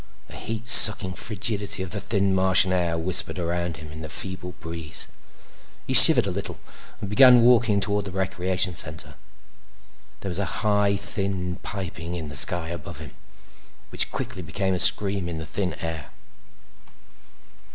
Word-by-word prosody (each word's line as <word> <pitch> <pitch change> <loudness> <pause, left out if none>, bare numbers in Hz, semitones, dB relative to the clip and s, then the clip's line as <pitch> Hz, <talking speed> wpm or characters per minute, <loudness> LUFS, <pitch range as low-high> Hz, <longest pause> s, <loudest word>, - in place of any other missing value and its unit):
The - - -14
heat 115 +1 -8
sucking 105 -4 +6
frigidity 100 -1 -1
of 90 - -10
the 100 - -6
thin 100 -1 -3
Martian 95 0 +1
air 85 -2 -3
whispered 90 +3 -2
around 85 -1 -6
him 75 0 -13
in 80 0 -12
a 80 - -10
feeble 90 +1 -7
breeze. 80 -3 -1 0.8
He - - -5
shivered - - +10
a - - -5
little - - -8 0.4
and 105 - -8
began 125 +4 +4
walking 120 -4 +1
toward 100 0 0
the 100 - -9
recreation 95 -1 -3
center. 80 -2 0 1.1
There 95 - -8
was 90 +1 -6
a 100 +2 -7
high, 105 -1 -1
thin 95 -3 -6
piping 90 -4 -9
in 80 -3 -8
the 75 - -10
sky 85 +2 -1
above 85 0 -10
him 75 -4 -12 0.8
which - - +2
quickly 90 - -8
became 95 +3 -5
a 90 - -5
scream 100 -3 +4
in 85 - -8
the 80 - -9
thin 90 +3 -6
air. 80 -4 -8
95 Hz, 160 wpm, -21 LUFS, 85-100 Hz, 1.1 s, shivered